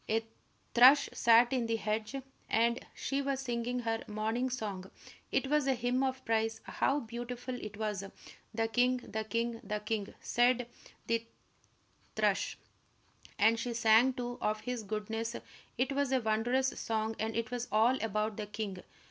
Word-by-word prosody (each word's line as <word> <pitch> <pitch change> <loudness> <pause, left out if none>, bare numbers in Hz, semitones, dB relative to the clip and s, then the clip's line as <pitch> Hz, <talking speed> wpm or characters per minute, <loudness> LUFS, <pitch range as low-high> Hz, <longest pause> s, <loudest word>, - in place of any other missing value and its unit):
A 225 +1 +1 0.5
thrush 260 +4 +8
sat 235 +2 +5
in 245 -3 +1
the 230 - +1
hedge, 215 +2 -2 0.3
and 235 +2 +2
she 275 0 -1
was 275 -1 -1
singing 245 -1 -2
her 225 -1 -1
morning 220 +4 -1
song. 200 -6 -4 0.4
It - - +1
was 295 0 +2
a 265 - +3
hymn 245 +2 0
of 260 -1 -1
praise, 225 0 +1
how 285 +2 0
beautiful 240 +2 -5
it 210 -1 -7
was! 210 -3 -2 0.5
"The 225 0 0
king 245 +3 +2
the 220 -3 -4
king 230 +2 -2
the 210 -1 -2
king," 210 -1 -3
sang 245 0 +2 0.4
the 230 0 0 0.9
thrush, - - +1 0.8
and 225 +2 +4
she 235 0 -3
sang, 230 +3 +5
too, 245 -1 -5
of 215 0 0
his 245 +1 -3
goodness, 220 +2 -3 0.4
it 255 +3 +1
was 280 -1 0
a 260 - +3
wondrous 240 +4 +1
song, 220 0 -1
and 220 +1 -2
it 230 +1 -2
was 245 -1 -3
all 230 +5 +3
about 215 0 -1
the 210 -1 -4
king. 210 -3 -4
230 Hz, 160 wpm, -32 LUFS, 220-250 Hz, 0.9 s, thrush